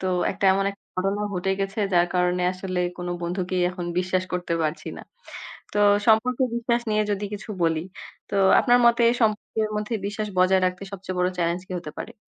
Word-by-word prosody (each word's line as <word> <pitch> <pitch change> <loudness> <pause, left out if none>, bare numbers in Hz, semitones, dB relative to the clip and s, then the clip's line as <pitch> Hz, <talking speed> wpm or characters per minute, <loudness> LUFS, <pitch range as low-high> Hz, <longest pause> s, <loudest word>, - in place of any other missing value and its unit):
তো 190 - -3 0.2
একটা, 200 +1 -4
এমন 195 +1 +1
একটা 200 - -16
ঘটনা 195 +2 0
ঘটে 180 +1 -1
গেছে 195 +2 -3
যার 175 0 +4
কারণে 180 0 +1
আসলে 185 -1 -4 0.2
কোনো 175 0 -4
বন্ধুকেই 180 +1 -1
এখন 180 -1 -6
বিশ্বাস 185 0 0
করতে 180 -1 -1
পারছি 155 +1 -3
না। - - -9 0.7
তো 205 - -1 0.3
সম্পর্কে 245 +4 +3
বিশ্বাস 235 0 0
নিয়ে 215 0 +2
যদি 205 0 -1
কিছু 205 - -8
বলি। 165 -1 +2 0.5
তো 200 - -4 0.3
আপনার 245 0 +4
মতে 235 0 +4 0.2
সম্পর্কের 215 0 0
মধ্যে 210 +2 -2
বিশ্বাস 210 +1 -3
বজায় 185 +1 +4
রাখতে 180 +1 -3
সবচেয়ে 185 -1 -6
বড় 180 0 +2
চ্যালেঞ্জ 170 +1 0
কী - - -6
হতে 155 -3 -8
পারে? - - -7
190 Hz, 185 wpm, -24 LUFS, 180-210 Hz, 0.7 s, যার